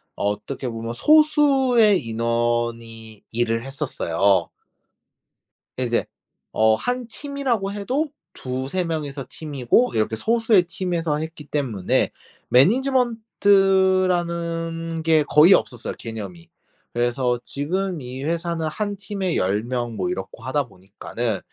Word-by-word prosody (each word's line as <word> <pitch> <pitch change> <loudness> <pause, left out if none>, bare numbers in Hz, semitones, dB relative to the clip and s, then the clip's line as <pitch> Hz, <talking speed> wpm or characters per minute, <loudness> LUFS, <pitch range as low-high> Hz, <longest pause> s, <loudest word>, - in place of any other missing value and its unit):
어떻게 105 +6 -3
보면 115 0 -5
소수의 270 - +4
인원이 115 -1 -2
일을 115 -1 0
했었어요. 100 - 0 1.3
예 - - +2
이제 120 0 0 0.5
어 110 0 +4
1 245 - -3
팀이라고 255 -6 -2
해도 255 +10 -2 0.2
2-3 130 +8 -3
명이서 145 -5 -4
팀이고 150 - +1
이렇게 110 0 +1
소수의 225 - +3
팀에서 170 -3 -2
했기 160 -1 -6
때문에 125 -12 0 0.4
management 240 - +3 0.9
라는 165 -1 -2
게 160 -2 +4
거의 150 +6 +6
없었어요 120 -10 0
개념이. 100 -7 -7 0.5
그래서 120 +1 0
지금 175 +6 -2
이 130 +2 -7
회사는 165 0 -2
1 205 +5 -3
팀에 195 -2 -3
10 100 +3 +1
명 120 -2 -3
뭐 90 -2 -1
이렇고 95 +5 -6
하다 135 +2 0
보니까는 100 +3 -5
145 Hz, 255 characters per minute, -22 LUFS, 115-190 Hz, 1.3 s, 거의